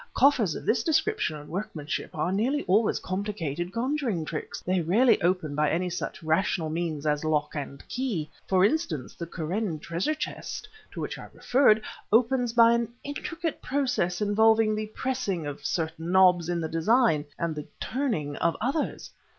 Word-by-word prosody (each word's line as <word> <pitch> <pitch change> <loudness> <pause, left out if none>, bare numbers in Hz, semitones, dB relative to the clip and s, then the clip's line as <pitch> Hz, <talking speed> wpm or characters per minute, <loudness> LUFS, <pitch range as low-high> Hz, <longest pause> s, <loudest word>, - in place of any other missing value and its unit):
Coffers 245 - +4
of - - -7
this 225 0 +2
description 335 - +1
and 150 0 -11
workmanship 160 -5 -4
are 180 - 0
nearly 255 +9 +1
always 205 +4 +3
complicated 185 -4 -3
conjuring 235 - -1
tricks; 155 0 -5
they 185 0 0
rarely 220 +10 +4
open 175 -4 +1
by 150 0 +2
any 180 +2 0
such 170 - -5
rational 160 0 +1
means 160 -3 -2
as 150 0 +1
lock 155 -1 0
and 140 -2 -6
key. 235 - -2 0.2
For 185 0 +4
instance, 190 - -1
the 170 - -6
Kûren 170 +2 -2
treasure 170 - -1
chest 310 - -5 0.3
to - - -5
which - - -4
I - - -10
referred, 245 -4 +4 0.3
opens 245 +2 +3
by 230 0 +6
an 235 -1 0
intricate 330 +3 -4
process 250 -10 0
involving 220 +1 +4
the 215 0 -2
pressing 215 - -2
of 145 0 -6
certain 160 +4 -2
knobs 180 -3 +5
in 175 -1 0
the 160 - -1
design, 165 - +3
and 170 -1 -1
the 150 -1 -7
turning 220 - -2
of 170 - +1
others." 275 +7 -2
185 Hz, 165 wpm, -27 LUFS, 160-235 Hz, 0.3 s, by